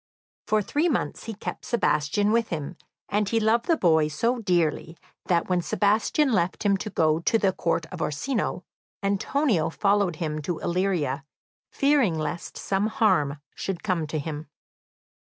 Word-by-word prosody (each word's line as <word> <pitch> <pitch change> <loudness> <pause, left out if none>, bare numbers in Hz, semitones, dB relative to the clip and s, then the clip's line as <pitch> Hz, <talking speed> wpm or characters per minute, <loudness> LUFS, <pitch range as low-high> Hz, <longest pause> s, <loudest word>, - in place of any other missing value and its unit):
For 215 -1 +2
three 305 - +1
months 270 - -2
he 225 -1 -5
kept 205 - -6
Sebastian 205 -1 +1
with 230 0 +2
him, 155 +1 -4 0.3
and 205 0 0
he 230 - +2
loved 225 +2 +2
the 330 - +3
boy 160 - +3
so 230 - 0
dearly 170 -4 0 0.3
that, 170 -2 +1
when 180 -1 +1
Sebastian 220 - +2
left 180 0 0
him 200 -1 +3
to 215 - -5
go 155 -4 +2
to 195 +7 +2
the 195 -4 +2
Court 170 -2 -1
of 180 - -6
Orsino, 180 - -2 0.4
Antonio 200 - +1
followed 200 0 +1
him 155 -1 -3
to 160 +3 -3
Illyria, 170 -7 -1 0.5
fearing 275 - +2
lest 155 +2 -4
some 195 +2 0
harm 180 - +1
should 190 -3 -4
come 175 -6 0
to 155 - -3
him. 150 +1 -5
185 Hz, 155 wpm, -26 LUFS, 160-220 Hz, 0.5 s, the